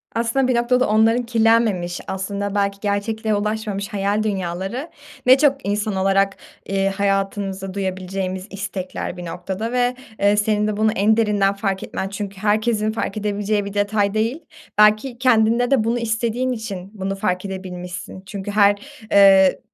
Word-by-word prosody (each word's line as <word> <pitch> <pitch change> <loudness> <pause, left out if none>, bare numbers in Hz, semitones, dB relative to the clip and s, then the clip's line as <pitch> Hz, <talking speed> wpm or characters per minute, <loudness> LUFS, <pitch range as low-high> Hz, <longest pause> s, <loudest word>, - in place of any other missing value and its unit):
Aslında 235 +3 +1
bir 255 - +2
noktada 250 +2 +2
onların 225 +3 +3
kirlenmemiş, 225 -6 +2
aslında 200 +1 -3
belki 200 -1 0
gerçekliğe 215 +1 -1
ulaşmamış 210 -1 -2
hayal 205 0 0
dünyaları 195 - -3 0.4
ne 255 +2 +7
çok 285 -1 +4
insan 205 0 -1
olarak, 195 +1 +2 0.3
eee, 195 0 0
hayatımızda 195 -1 -1
duyabileceğimiz 190 0 -3
istekler 190 -2 -5
bir 175 - -7
noktada 190 +6 -4
ve, 250 0 +1 0.2
eee, 205 +1 +3
senin 210 0 +1
de 210 -1 -2
bunu 215 0 +3
en 215 +3 +3
derinden 205 -3 +2
fark 195 -1 -2
etmen 190 - -4
çünkü 200 -1 -6
herkesin 215 +1 +1
fark 215 -2 -3
edebileceği 205 0 -1
bir 200 - -6
detay 205 0 +1
değil. 230 +9 -1 0.3
Belki 215 +4 +4
kendinde 240 0 +3
de 260 -5 +4
bunu 235 +2 0
istediğin 235 +3 -1
için 205 -6 -5
bunu 195 -1 -3
fark 185 -2 -1
edebilmişsin. 185 -1 -7
Çünkü 195 +2 -6
her, 205 -1 +5 0.4
eee, 195 -2 +6
205 Hz, 150 wpm, -21 LUFS, 195-220 Hz, 0.4 s, ne